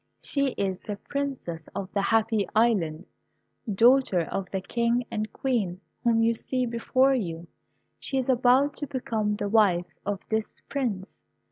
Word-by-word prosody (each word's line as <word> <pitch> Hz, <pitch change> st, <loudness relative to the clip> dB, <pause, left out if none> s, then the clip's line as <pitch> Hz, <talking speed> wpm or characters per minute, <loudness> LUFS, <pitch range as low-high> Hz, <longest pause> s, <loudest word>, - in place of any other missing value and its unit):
She 275 Hz, -3 st, 0 dB
is 190 Hz, -2 st, -1 dB
the 205 Hz, -, -5 dB
Princess 260 Hz, -, -4 dB
of 195 Hz, -1 st, -5 dB
the 200 Hz, -, +1 dB
Happy 220 Hz, -1 st, +2 dB
Island, 190 Hz, -8 st, +2 dB, 0.7 s
daughter 235 Hz, -2 st, +4 dB
of 185 Hz, +3 st, -4 dB
the 190 Hz, -, -2 dB
King 235 Hz, +4 st, 0 dB
and 215 Hz, 0 st, -3 dB
Queen 215 Hz, -10 st, -1 dB, 0.2 s
whom 230 Hz, -1 st, +3 dB
you 230 Hz, +1 st, +3 dB
see 255 Hz, +2 st, -2 dB
before 255 Hz, +3 st, +2 dB
you. 170 Hz, -9 st, -3 dB, 0.5 s
She 270 Hz, -, -3 dB
is 260 Hz, -, 0 dB
about 260 Hz, +3 st, +4 dB
to 290 Hz, -, -3 dB
become 220 Hz, -6 st, -1 dB
the 205 Hz, 0 st, -2 dB
wife 185 Hz, -6 st, +3 dB
of 200 Hz, -1 st, -2 dB
this 220 Hz, -1 st, -2 dB
Prince. 225 Hz, -9 st, -3 dB
225 Hz, 150 wpm, -27 LUFS, 195-250 Hz, 0.7 s, daughter